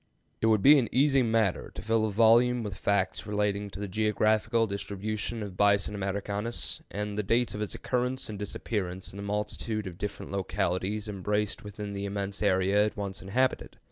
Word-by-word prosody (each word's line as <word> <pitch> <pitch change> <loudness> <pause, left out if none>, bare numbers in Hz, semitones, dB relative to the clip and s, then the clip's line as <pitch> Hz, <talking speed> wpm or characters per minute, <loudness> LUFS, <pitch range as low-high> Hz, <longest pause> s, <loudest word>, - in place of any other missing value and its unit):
It 110 - +3
would 110 -3 +3
be 145 +1 +8
an 120 - -1
easy 135 +1 +4
matter 110 -5 +1
to - - -6
fill 110 0 +2
a - - -3
volume 115 +3 +5
with 100 -3 -4
facts 95 +1 0
relating 105 -1 0
to 100 - -9
the 105 - -3
geographical 110 +3 +2
distribution 105 +2 -3
of 100 -3 -7
Bison 100 +1 +3
americanus 100 +3 -3
and 105 0 -3
the - - +3
dates 115 +4 +1
of 105 - -5
its 105 - -3
occurrence 125 +1 -1
and 105 -2 -6
disappearance 95 -3 -4
in - - -9
the - - -5
multitude 105 +1 -3
of 90 -2 -8
different 105 -2 -5
localities 100 +1 -1
embraced 105 0 -2
within 105 0 -6
the 100 0 -3
immense 100 0 -3
area 100 0 +3
it 105 0 -4
once 100 -1 -4
inhabited. 125 +7 0
105 Hz, 180 wpm, -29 LUFS, 100-110 Hz, -, be